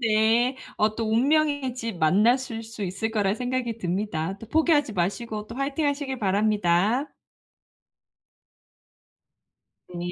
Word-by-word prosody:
네. 230 Hz, +3 st, +3 dB, 0.2 s
어 215 Hz, 0 st, +1 dB
또 225 Hz, -2 st, -2 dB
운명의 285 Hz, +1 st, +2 dB
집 230 Hz, -7 st, -5 dB
만나실 225 Hz, -, +2 dB
수 220 Hz, -2 st, -8 dB
있을 200 Hz, +4 st, -2 dB
거라는 205 Hz, -2 st, 0 dB
생각이 250 Hz, -2 st, -2 dB
듭니다. 185 Hz, -2 st, -2 dB
또 225 Hz, -, -10 dB
포기하지 310 Hz, -5 st, +2 dB
마시고 210 Hz, +4 st, -2 dB
또 230 Hz, -, -9 dB
화이팅하시길 280 Hz, 0 st, -1 dB
바랍니다. 210 Hz, -, +2 dB, 2.9 s
니 175 Hz, -1 st, -5 dB
225 Hz, 250 characters per minute, -25 LUFS, 205-255 Hz, 2.9 s, 네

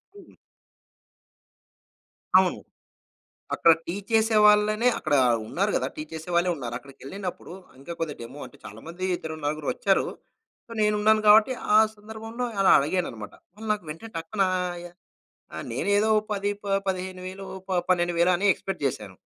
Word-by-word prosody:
హ్మ్. 405 Hz, -, -15 dB, 2.1 s
అవును. -, -, +2 dB, 1.0 s
అక్కడ 165 Hz, -, +6 dB
టీ 170 Hz, -, -3 dB, 0.2 s
చేసే 220 Hz, 0 st, +3 dB
వాళ్ళనే 210 Hz, +3 st, +4 dB
అక్కడ 155 Hz, -2 st, -1 dB, 0.3 s
ఉన్నారు 200 Hz, -, -1 dB
కదా! -, -, 0 dB
టీ 155 Hz, -, -4 dB
చేసే 160 Hz, +2 st, -7 dB
వాళ్ళే 175 Hz, +1 st, +3 dB
ఉన్నారు. 120 Hz, -4 st, -6 dB
అక్కడికేళ్ళినప్పుడు 140 Hz, +9 st, -8 dB, 0.3 s
ఇంకా 155 Hz, +5 st, -7 dB
కొద్ది 160 Hz, -3 st, -2 dB
డెమో 120 Hz, +5 st, -9 dB
అంటే 125 Hz, -, -17 dB
చాలా 110 Hz, +1 st, -10 dB
మంది 175 Hz, +3 st, -6 dB
ఇద్దరు 160 Hz, -2 st, -6 dB
నలుగురోచ్చారు. 155 Hz, +6 st, 0 dB, 0.6 s
సో, -, -, -25 dB
నేనున్నాను 210 Hz, +1 st, +3 dB
గాబట్టి 215 Hz, +4 st, +7 dB, 0.2 s
ఆ -, -, +8 dB, 0.2 s
సందర్భంలో 220 Hz, +3 st, -7 dB, 0.2 s
అలా 195 Hz, -, +5 dB
అడిగానన్నమాట. 140 Hz, -, -3 dB, 0.2 s
వాళ్ళు 220 Hz, +2 st, -9 dB
నాకు 205 Hz, -5 st, -4 dB
వెంటనే 190 Hz, +9 st, -9 dB
టక్కున 165 Hz, +5 st, -2 dB
ఆహ్, 180 Hz, -1 st, -2 dB
య -, -, -7 dB, 0.7 s
ఆ! -, -, -6 dB, 0.2 s
నేనేదో 205 Hz, +2 st, +1 dB, 0.2 s
10 200 Hz, 0 st, -1 dB
ప -, -, -10 dB, 0.2 s
15,000 185 Hz, +1 st, -5 dB, 0.2 s
ప -, -, -8 dB, 0.2 s
12,000 175 Hz, -1 st, +2 dB
అని 200 Hz, +4 st, 0 dB
ఎక్స్‌పెక్ట్ 195 Hz, -1 st, -6 dB
జేశాను. 105 Hz, -7 st, -3 dB
185 Hz, 140 wpm, -25 LUFS, 160-210 Hz, 2.1 s, ఆ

